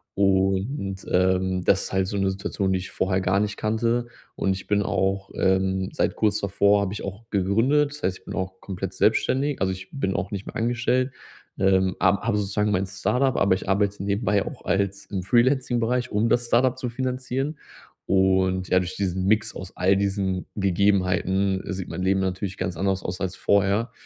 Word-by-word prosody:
Und, 95 +2 0
ähm, 95 0 +2
das 95 - +3
ist - - -7
halt 95 -1 +1
so 100 - -3
'ne 95 -1 +1
Situation, 95 0 -2
die 95 - +1
ich 95 - -8
vorher 95 0 0
gar 95 +2 +2
nicht 105 0 -1
kannte. 115 +2 0 0.3
Und, 95 - 0
ich 95 - -8
bin 105 0 +2
auch, 95 0 -1
ähm 95 0 +1
seit - - 0
kurz 105 -2 +1
davor 100 +1 +3
habe 100 0 -2
ich - - -6
auch 100 +4 -7
gegründet, 115 +10 +2
das 150 0 -10
heißt, 95 0 -1
ich - - -31
bin - - -6
auch 95 -1 -4
komplett 95 -2 -5
selbstständig, 140 +2 +1
also, 95 0 +2
ich 95 0 -7
bin 95 -9 -2
auch 100 0 -2
nicht 100 0 -5
mehr - - -9
angestellt. 125 +3 0 0.5
Ähm, 95 -1 +3
am 95 +1 +3
habe 110 -1 0
sozusagen 105 +1 0
mein 95 0 0
Startup, 125 +7 0
aber 100 - +3
ich 95 - -6
arbeite 100 0 +1
nebenbei 100 0 +1
auch - - -8
als 100 0 -1
im 95 -3 -4
Freelancing 125 +2 +2
Bereich, 125 +2 0
um 105 +2 +1
das 120 +1 +1
Startup 125 +2 +2
zu 125 -1 -3
finanzieren. 130 +4 -3 0.5
Und 95 -1 +2
ja, 95 - +4
durch 90 0 -4
diesen 95 -2 -1
Mix 105 +1 +1
aus 95 -1 -9
all 95 +2 +3
diesen 95 -2 -1
Gegebenheiten 95 0 +1
sieht 95 -1 -5
mein 95 - -5
Leben 95 +1 +2
natürlich 95 0 -2
ganz 95 -2 -3
anders 95 +2 0
aus 90 +2 -5
als 95 -1 -2
vorher. 100 +4 +1
100 Hz, 195 wpm, -24 LUFS, 95-110 Hz, 0.5 s, ja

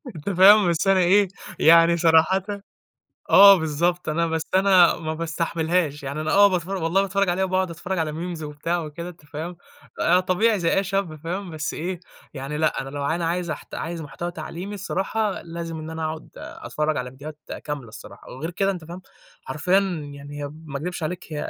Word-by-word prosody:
أنت 155 +6 -5
فاهم، 195 +1 +7
بس 170 +3 0
أنا 195 -1 +5
إيه، 190 +3 +4 0.3
يعني 170 +1 +6
صراحةً 165 +3 +4 0.9
آه 200 0 +10
بالضبط، 165 +3 -1
أنا 165 +2 +1
بس 160 -1 -1
أنا 190 -2 +5
ما 160 -1 -4
باستحملهاش، 165 -2 -1
يعني 140 +3 -4
أنا 200 +6 +5
باتفرج 185 0 -2
والله 180 +4 +2
باتفرج 195 0 0
عليها 185 +2 +1
وباقعد 185 -1 0
أتفرج 180 +2 -4
على 155 -2 -1
Memes 170 0 -5
وبتاع 150 +4 -3
وكده، 170 +3 -7
أنت 170 -4 -13
فاهم، 160 +4 -6 0.4
آآ 180 +2 +4
طبيعي 200 +4 +2
زي 165 - +1
أي 195 - +1
شاب 195 -4 -2
فاهم، 175 +4 -5
بس 155 -2 -4
إيه، 175 +2 -4 0.3
يعني 140 +3 -5
لأ. 155 - +1
أنا 135 - -8
لو 145 0 -5
ع 160 - +1
أنا 170 -1 -2
عايز 175 0 -1
احت 150 - -7
عايز 165 0 -4
محتوى 170 +4 -5
تعليمي 175 +4 -7
الصراحة 200 +2 -2
لازم 165 -1 -6
إن 155 +1 -7
أنا 160 0 -4
أقعد 155 0 -5
أتفرج 150 0 -3
على 125 0 -3
فيديوهات 145 +3 -10 0.3
كاملة 145 -6 -5
الصراحة، 110 - -12
وغير 155 +7 -5
كده 195 +2 0
أنت 175 -4 -6
فاهم، 175 +2 -9 0.4
حرفيًا 180 +6 +1 0.4
يعني 145 +1 -8
هي 140 - -5 0.2
ما 140 -1 -5
اكدبش 175 +2 -5
عليك، 175 +3 -4
هي - - -3
170 Hz, 190 wpm, -23 LUFS, 155-185 Hz, 0.9 s, آه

